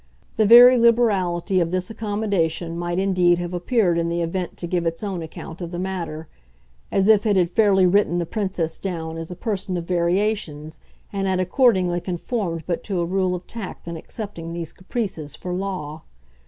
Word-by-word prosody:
The 215 -2 +4
very 245 +2 +9
liberality 200 -6 +2
of 170 -2 +1
this 185 +3 -2
accommodation 200 -6 -1
might 175 0 -3
indeed 180 -2 +3
have 175 0 -4
appeared 180 -1 +1
in 170 0 0
the 170 0 -1
event 175 +1 -3
to - - -5
give 170 -1 -1
its 165 +4 -3
own 195 -4 -3
account 160 +1 -9
of 170 - -4
the 175 - -6
matter 175 -4 -4 0.6
as 195 0 +2
if 215 -2 +5
it 205 - +3
had 180 -2 +2
fairly 195 -2 +4
written 180 -1 +3
the 175 - -1
Princess 185 -5 -3
down 165 -4 -4
as 165 0 -6
a 180 - -6
person 190 -2 -3
of 170 - -4
variations 170 -3 -1 0.3
and 195 -1 -1
had 185 -1 +1
accordingly 185 -3 +2
conformed 175 -2 -3
but 170 -2 -2
to 195 -4 -2
a 170 - +1
rule 185 +1 0
of 180 - -8
tact 215 -6 -8
in 170 - -4
accepting 170 -1 -7
these 170 -2 -5
caprices 185 - -5
for 180 - -5
law. 180 -5 -4
180 Hz, 185 wpm, -22 LUFS, 170-200 Hz, 0.6 s, very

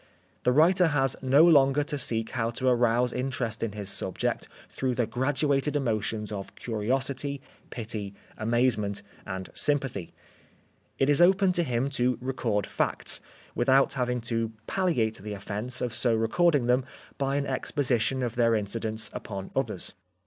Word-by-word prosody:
The 125 - +5
writer 170 +6 +5
has 135 -4 +1
no 135 +5 +5
longer 145 -3 +5
to 145 - -3
seek 115 -3 0
how 115 -3 -1
to 130 +3 -3
arouse 120 0 +3
interest 125 -3 -2
in 115 -3 -2
his 100 -2 -3
subject - - -1 0.2
through 130 -2 -2
the 120 - +1
graduated 135 +4 0
emotions 110 -5 -1
of 100 -2 -6
curiosity, 135 +5 -2 0.3
pity, 105 -4 -5 0.2
amazement 110 -3 0 0.2
and 95 -1 -5
sympathy. 135 - -1 0.9
It 135 - +2
is 145 +2 +4
open 190 +2 +5
to 175 - +1
him 125 -4 0
to 125 -2 +1
record 120 -6 -1
facts, - - -2 0.3
without 135 +3 +3
having 125 -2 -1
to 115 -1 -1
palliate 125 - 0
the 105 +1 -5
offence 105 +5 -2
of 120 -2 -2
so 120 0 +2
re 110 0 +1
cording 160 -4 +3
them 125 +2 +3 0.4
by 135 0 0
an 140 0 0
exposition 130 -2 0
of 120 -2 -2
their 115 -1 +3
incidence 110 +1 -1
upon 100 -3 -6
others. 115 -9 -1
125 Hz, 150 wpm, -27 LUFS, 110-135 Hz, 0.9 s, The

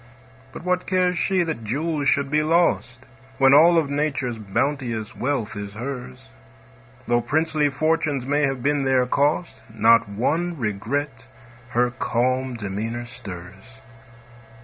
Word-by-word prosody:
But - - -9
what 180 0 -1
cares 180 -1 +2
she 185 -2 +2
that 160 -9 -4
jewels 145 +5 -1
should 140 -1 +1
be 150 0 +3
lost, 155 -6 +1 0.4
When 135 0 +5
all 165 +4 +7
of 160 -3 +2
Nature's 140 -5 -2
bounteous 115 +1 -2
wealth 130 -6 -2
is 100 0 -7
hers? 125 - -7 0.8
Though 120 0 +2
princely 155 +3 +1
fortunes 155 -2 0
may 145 +2 +1
have 135 -4 -1
been 145 0 +1
their 130 -1 +3
cost, 145 -1 0
Not 115 0 +4
one 160 +12 -1
regret 120 +4 -3 0.4
her 125 0 +1
calm 130 +2 -1
demeanor 110 +3 -4
stirs. 95 +1 -11
130 Hz, 130 wpm, -23 LUFS, 115-150 Hz, 0.8 s, all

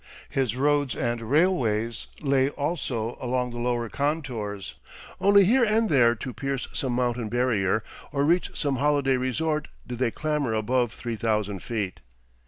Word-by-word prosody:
His 130 -4 0
roads 145 0 +1
and 120 -1 -1
railways 115 - +1
lay 135 -2 +2
also 140 -7 -3
along 125 0 -1
the 120 - -6
lower 120 -1 0
contours, 125 -8 -3 0.5
only 200 0 +6
here 245 +6 +4
and 220 0 +2
there 120 -4 +5
to 125 +3 -6
pierce 135 +3 -3
some 130 -3 -1
mountain 120 -2 0
barrier 110 -4 +1 0.3
or 140 -1 +1
reach 175 +4 +2
some 140 -3 0
holiday 140 -1 +2
resort 150 +4 -1 0.2
did 120 -1 -6
they 130 -2 +2
clamber 150 -3 -1
above 120 +2 +1
3000 105 -4 -2
feet. 105 -5 -3
125 Hz, 145 wpm, -26 LUFS, 115-145 Hz, 0.5 s, only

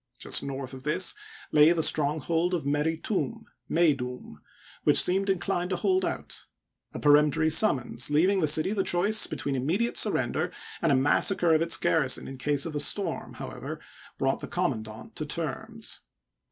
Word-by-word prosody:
Just - - +1
north 135 -1 -6
of 130 - -9
this 150 +6 +1 0.4
lay 150 +2 +6
the 165 -2 0
stronghold 160 +5 +1
of 165 - -4
Meri 150 +3 0
Tum 220 +5 -3 0.2
(Meydoum), 125 - -1 0.4
which - - +5
seemed 195 +2 +2
inclined 180 -1 -1
to 185 - -1
hold 185 +1 +1
out. - - -5 0.4
A - - -7
peremptory 150 +1 +3
summons, 130 - +2
leaving 185 +6 +2
the 155 - +2
city 155 +5 +3
the 205 - 0
choice 200 +6 +3
between 140 - -4
immediate 175 - -1
surrender - - 0 0.3
and 165 - +2
a - - +4
massacre 165 +5 +3
of 155 - +3
its 165 0 +4
garrison 140 -6 0
in 135 -1 -9
case 145 +1 -1
of 160 -2 -6
a - - -1
storm, 170 +3 -2
however, - - -7 0.4
brought - - 0
the - - -6
commandant 110 0 -4
to 155 - -3
terms. 195 +9 -5
160 Hz, 165 wpm, -27 LUFS, 140-180 Hz, 0.4 s, lay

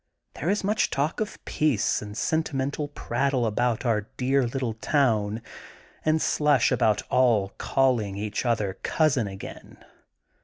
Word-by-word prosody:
There 160 - -3
is 205 +1 +1
much 210 +2 +1
talk 140 +3 -1
of 215 -1 -3
peace 150 -9 +1
and 105 0 -8
sentimental 145 -1 -1
prattle 135 -2 -1
about 115 +2 0
our 105 -3 +1
dear 135 0 +2
little 125 -2 -2
town 110 -3 +1 0.6
and 155 0 +2
slush 145 -5 +2
about 110 -2 +2
all 115 -6 +3
calling 120 -7 +1
each 105 0 -3
other 110 -6 -1
cousin^' 130 -10 +1
again. 95 - -10
125 Hz, 130 wpm, -26 LUFS, 110-145 Hz, 0.6 s, all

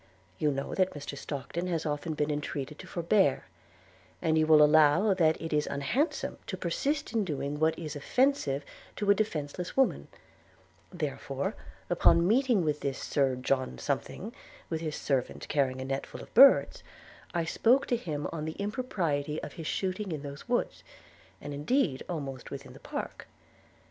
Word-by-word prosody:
You 150 - +2
know 140 -1 -3
that 185 -3 +1
Mr 145 0 -6
Stockton 150 +5 -4
has 170 -3 -1
often 150 +1 -2
been 150 0 0
entreated 145 0 -4
to 190 - -9
forbear; 170 -6 +2 0.7
and 160 -2 +1
you 155 0 +3
will 155 -1 +8
allow 155 +6 +5
that 160 -4 +3
it 165 -1 -4
is 150 0 +1
unhandsome 245 - -1
to - - -4
persist 295 -2 -1
in 225 -2 +2
doing 145 -4 -3
what 160 +1 +2
is 155 -2 -5
offensive 145 - +1 0.3
to 205 -1 +2
a - - +8
defenceless 175 - -3
woman: 265 - +2 0.8
therefore, - - -3 0.3
upon 170 +1 +4
meeting 240 -3 +3
with 150 -1 0
this 135 -2 -2
Sir 135 -3 +1
John 130 - -1
Something, - - -3 0.4
with 160 - -1
his 155 -2 -3
servant 130 -3 -2
carrying 135 -3 +1
a 130 - -4
net 135 +1 -3
full - - -9
of - - -16
birds, 270 +4 +7 0.5
I 170 -1 +1
spoke 245 +10 +3
to 245 - +1
him 150 -10 -3
on 155 -2 -4
the 160 - -3
impropriety 180 - -2
of - - -6
his 165 -4 -6
shooting 190 +1 -2
in 150 -3 -4
those 140 +9 -8
woods, 245 - -1 0.6
and 145 - -6
indeed 150 - +1
almost 140 -6 -5
within 135 -2 -8
the - - -13
park. - - -6
155 Hz, 165 wpm, -30 LUFS, 145-190 Hz, 0.8 s, will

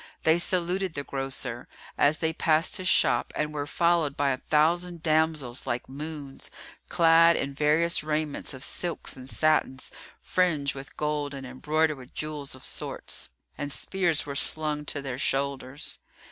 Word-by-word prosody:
They 160 +2 +4
saluted 180 0 0
the 140 - -2
grocer, 135 -1 -3 0.3
as 150 +2 +4
they 160 0 0
passed 160 0 +2
his 185 - -3
shop - - +4
and 150 0 -2
were 145 -1 -3
followed 170 -4 +1
by 140 -1 +2
a 130 - -1
thousand 170 +4 +1
damsels 155 -5 0
like 120 0 -2
moons, 145 0 -7 0.4
clad 165 0 +6
in 140 - -2
various 150 +4 +2
raiments 150 -2 -2
of 130 - -10
silks 170 +2 -2
and 130 0 -6
satins 155 -4 +1 0.3
fringed 155 -6 +1
with 135 0 -10
gold 150 -1 -2
and 135 -1 -7
embroidered 155 +4 0
with 125 0 -14
jewels 150 -3 -4
of 130 - -14
sorts, - - -5 0.3
and 145 0 -3
spears 175 -1 +1
were 140 - -5
slung 150 +1 +1
to 145 -1 -3
their 130 -2 -4
shoulders. 135 0 -1
150 Hz, 155 wpm, -27 LUFS, 140-160 Hz, 0.4 s, clad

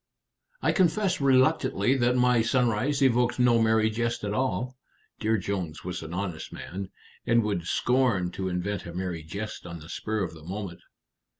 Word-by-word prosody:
"I - - +4
confess 190 -1 +2
reluctantly 130 -3 +3
that 125 0 +2
my 125 -1 +4
sunrise 125 +4 +1
evoked 120 -1 +3
no 120 -2 +4
merry 110 0 +3
jest 120 +1 -2
at 105 0 -2
all." 130 +1 -1 0.4
Dear 110 +1 +2
Jones 90 -5 -4
was 90 0 -4
an 80 0 -8
honest 90 -3 -4
man, 95 +1 -6 0.4
and 115 -1 +4
would 100 -5 -2
scorn 120 -9 +2
to 95 0 -3
invent 90 +1 -3
a 85 - -8
merry 90 -3 -3
jest 100 +5 -6
on 85 -1 -6
the 80 0 -12
spur 110 +4 -2
of 85 - -4
the 80 -2 -13
moment. 95 0 -6
110 Hz, 170 wpm, -27 LUFS, 90-125 Hz, 0.4 s, I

